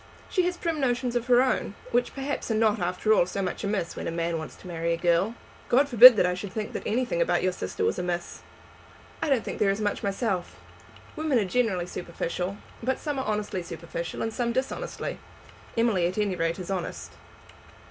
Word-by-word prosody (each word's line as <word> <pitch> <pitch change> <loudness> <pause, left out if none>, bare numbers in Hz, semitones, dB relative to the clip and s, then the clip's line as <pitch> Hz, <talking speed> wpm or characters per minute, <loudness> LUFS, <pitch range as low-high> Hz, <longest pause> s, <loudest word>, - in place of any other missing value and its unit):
She 370 - +3
has 360 0 -2
prim 335 -3 -2
notions 245 -2 0
of 240 0 -1
her 250 0 +6
own, 250 -5 -1 0.2
which 245 +1 +1
perhaps 275 0 -3
are 225 - +1
not 215 -1 +3
after 180 +5 +1
all 175 - +4
so 195 - -4
much 180 - -3
amiss 200 -4 -2
when - - -5
a - - -1
man 165 0 -1
wants 155 - -8
to - - -13
marry 170 -1 -1
a - - -1
girl." 175 +6 +2 0.3
"God 270 +4 +4
forbid 250 -1 +10
that 195 - +3
I 180 - +1
should 185 +2 -6
think 215 +1 -4
that - - -3
anything 255 - 0
about - - +2
your 185 - +2
sister 180 - -3
was - - 0
amiss!" 175 -1 -3 0.8
"I - - 0
don't 265 -5 +2
think - - -5
there 205 - +3
is 195 +2 0
much 205 -1 -1
myself. 195 -2 -2 0.6
Women 310 -4 +1
are 215 - +2
generally 190 -4 0
superficial, 180 +2 -4 0.2
but 255 +3 0
some 290 -3 -3
are 265 - -2
honestly 210 -3 -2
superficial 170 -1 -5
and 225 - -2
some 235 0 0
dishonestly. 270 - -3 0.6
Emily 215 -7 +3
at 180 - -5
any 205 -3 +1
rate 165 -1 -1
is 185 0 -6
honest." 185 -3 -4
210 Hz, 210 wpm, -27 LUFS, 180-245 Hz, 0.8 s, forbid